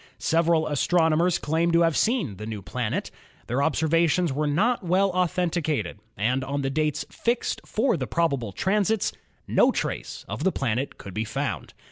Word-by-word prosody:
Several 165 Hz, -1 st, +2 dB
astronomers 160 Hz, +3 st, +2 dB
claimed 165 Hz, +3 st, 0 dB
to 170 Hz, -, +5 dB
have 165 Hz, -2 st, +3 dB
seen 210 Hz, -, +1 dB
the 105 Hz, +2 st, -7 dB
new 105 Hz, -3 st, -5 dB
planet. 110 Hz, +5 st, -3 dB, 0.3 s
Their 125 Hz, +4 st, -1 dB
observations 160 Hz, +1 st, +2 dB
were 150 Hz, +2 st, 0 dB
not 210 Hz, +12 st, +2 dB
well 185 Hz, +3 st, +2 dB
authenticated, 175 Hz, -, -1 dB, 0.2 s
and 125 Hz, +6 st, +1 dB
on 140 Hz, +1 st, -2 dB
the 135 Hz, -, -1 dB
dates 150 Hz, 0 st, 0 dB
fixed 235 Hz, +1 st, -1 dB
for 235 Hz, +1 st, +1 dB
the 130 Hz, -4 st, -3 dB
probable 140 Hz, -10 st, 0 dB
transits 205 Hz, -, +1 dB, 0.3 s
no -, -, +4 dB
trace -, -, -4 dB
of -, -, -4 dB
the 190 Hz, -, +3 dB
planet 130 Hz, -1 st, -2 dB
could 100 Hz, -, -9 dB
be 110 Hz, -, -1 dB
found. 110 Hz, 0 st, -4 dB
160 Hz, 160 wpm, -25 LUFS, 135-180 Hz, 0.3 s, to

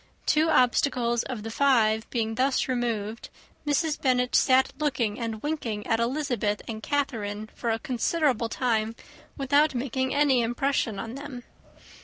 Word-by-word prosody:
Two 310 Hz, +1 st, +3 dB
obstacles 245 Hz, -3 st, +2 dB
of 245 Hz, -5 st, -6 dB
the 225 Hz, -, -5 dB
five 225 Hz, -4 st, +2 dB
being 225 Hz, -2 st, -1 dB
thus 260 Hz, +3 st, +1 dB
removed, 230 Hz, -3 st, -2 dB, 0.4 s
Mrs. 295 Hz, +1 st, 0 dB
Bennet 250 Hz, -2 st, +1 dB
sat 260 Hz, 0 st, +4 dB
looking 255 Hz, -8 st, 0 dB
and 225 Hz, -2 st, -4 dB
winking 245 Hz, -9 st, -3 dB
at 225 Hz, -1 st, +1 dB
Elizabeth 240 Hz, -5 st, -1 dB
and 220 Hz, -1 st, -5 dB
Catherine 215 Hz, -6 st, -2 dB
for 235 Hz, -, -3 dB
a 225 Hz, -, +1 dB
considerable 255 Hz, +1 st, 0 dB
time, 225 Hz, -2 st, 0 dB, 0.4 s
without 285 Hz, +1 st, +3 dB
making 260 Hz, +1 st, -1 dB
any 280 Hz, -4 st, +3 dB
impression 240 Hz, -2 st, 0 dB
on 225 Hz, +4 st, -5 dB
them. 275 Hz, -2 st, -8 dB
245 Hz, 140 wpm, -26 LUFS, 225-275 Hz, 0.4 s, sat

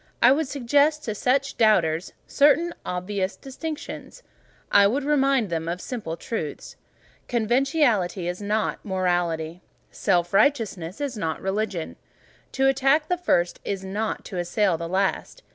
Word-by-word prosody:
I 240 Hz, -, +6 dB
would 300 Hz, +2 st, +2 dB
suggest 285 Hz, +3 st, +2 dB
to 215 Hz, -, -3 dB
such 270 Hz, +6 st, 0 dB
doubters 175 Hz, -7 st, +3 dB
certain 300 Hz, +4 st, +3 dB
obvious 185 Hz, +2 st, -3 dB
distinctions; 310 Hz, -, -7 dB, 0.5 s
I 200 Hz, 0 st, +7 dB
would 265 Hz, +7 st, -1 dB
remind 275 Hz, -7 st, +2 dB
them 165 Hz, -1 st, -2 dB
of 175 Hz, +2 st, -2 dB
certain -, -, -10 dB
simple 205 Hz, -10 st, -4 dB
truths. 160 Hz, -7 st, -5 dB, 0.5 s
Conventionality 235 Hz, -, +1 dB
is 180 Hz, +3 st, -4 dB
not 210 Hz, +2 st, -1 dB
morality. 175 Hz, -3 st, -1 dB, 0.3 s
Self 175 Hz, -3 st, 0 dB
righteousness 200 Hz, -, +1 dB
is 275 Hz, -5 st, -3 dB
not 165 Hz, -5 st, -2 dB
religion. 195 Hz, -3 st, -3 dB, 0.6 s
To 270 Hz, 0 st, +2 dB
attack 275 Hz, +3 st, +2 dB
the 360 Hz, -, +1 dB
first 175 Hz, -, +1 dB
is 195 Hz, -1 st, -4 dB
not 210 Hz, +3 st, -3 dB
to 185 Hz, -, -5 dB
assail 175 Hz, +2 st, +1 dB
the 165 Hz, +1 st, -5 dB
last. 195 Hz, -, -1 dB
210 Hz, 140 wpm, -24 LUFS, 180-275 Hz, 0.6 s, I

